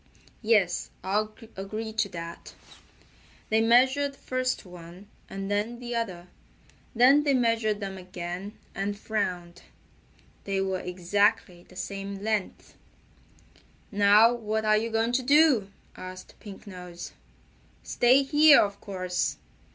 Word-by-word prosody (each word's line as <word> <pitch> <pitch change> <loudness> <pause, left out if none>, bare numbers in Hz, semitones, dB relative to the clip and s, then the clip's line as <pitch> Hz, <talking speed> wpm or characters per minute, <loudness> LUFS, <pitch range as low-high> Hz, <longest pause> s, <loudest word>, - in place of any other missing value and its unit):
"Yes, 210 -6 +2
I'll 210 +3 -1 0.2
agree 215 +3 -5
to 215 -2 0
that." 170 -2 -9 0.9
They 220 0 +3
measured 265 +5 +3
first 255 -3 -3
one, 180 +1 -12 0.2
and 195 +1 -5
then 210 +4 -1
the 240 0 -6
other. 185 -7 -3 0.7
Then 260 +5 +6
they 285 -2 +2
measured 230 -3 +1
them 195 -1 -5
again, 185 +3 -7 0.2
and 200 +1 -3
frowned. 180 -5 -3 0.8
They 195 -1 -1
were 190 -1 -1
exactly 180 +1 0
the 185 - -16
same 195 +1 -6
length. 215 -3 -3 1.2
"Now 205 +3 +5
what 220 -2 -3
are 215 0 +4
you 225 +2 0
going 225 +1 0
to 250 +2 +1
do?" 275 -6 +4 0.3
asked 185 0 -10
Pink 205 -1 -11
Nose. 180 -3 -9 0.7
"Stay 255 +3 +3
here, 295 +1 +6
of 200 -1 -1
course. 185 -2 -2
205 Hz, 120 wpm, -27 LUFS, 185-230 Hz, 1.2 s, Then